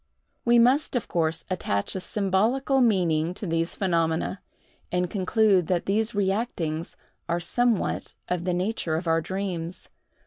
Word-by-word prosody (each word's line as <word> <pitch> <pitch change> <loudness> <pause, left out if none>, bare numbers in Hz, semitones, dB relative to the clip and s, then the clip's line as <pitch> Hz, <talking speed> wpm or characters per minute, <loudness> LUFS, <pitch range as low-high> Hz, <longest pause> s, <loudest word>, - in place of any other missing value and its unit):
We 240 0 +5
must, 255 +5 +4
of 245 - -1
course, 160 -1 -1
attach 100 - -1
a 190 - -3
symbolical 220 +9 +1
meaning 175 -7 +2
to 210 - -6
these 165 -1 -1
phenomena, 170 0 0 0.5
and 180 -1 0
conclude 195 -2 +2
that 180 -2 0
these 220 +3 +1
reactings 190 -6 -1 0.3
are 170 +1 +1
somewhat 235 +5 0
of 180 -1 -1
the 180 0 0
nature 180 -3 -1
of 165 +3 -3
our 165 0 +3
dreams. 185 -2 -4
185 Hz, 140 wpm, -26 LUFS, 165-215 Hz, 0.5 s, We